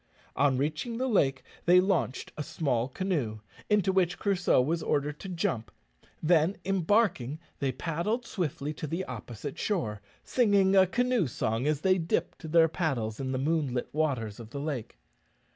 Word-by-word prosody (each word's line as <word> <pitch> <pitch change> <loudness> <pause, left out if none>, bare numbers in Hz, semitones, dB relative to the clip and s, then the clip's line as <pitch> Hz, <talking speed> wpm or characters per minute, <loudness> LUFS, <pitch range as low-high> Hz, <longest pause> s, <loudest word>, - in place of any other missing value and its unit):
On 140 -2 +3
reaching 155 - -2
the 260 +2 0
lake 135 - +2 0.2
they 180 +1 +8
launched 165 - 0
a - - -4
small 130 -6 -1
canoe, 135 - -2 0.3
into 205 -3 +3
which 180 -2 +2
Crusoe 195 -7 +2
was 160 +6 +1
ordered 145 0 -1
to 195 - -7
jump; 165 - -2 0.5
then, 165 +3 +3
embarking, 190 - +1 0.2
they 135 -2 0
paddled 170 - -2
swiftly 150 -4 -3
to 155 - -5
the 170 +5 -2
opposite 120 +2 -7
shore, 110 - -1 0.2
singing 200 -5 +3
a 190 -1 +6
canoe 245 - +1
song 115 +2 -1
as 150 -1 +1
they 185 +1 +3
dipped 165 -1 -2
their 165 0 +6
paddles 135 - -2
in 130 -1 -2
the 130 - -1
moonlit 135 -3 0
waters 130 -9 -1
of 115 -2 -9
the 140 - -6
lake. 140 -6 -4
155 Hz, 160 wpm, -29 LUFS, 130-190 Hz, 0.5 s, they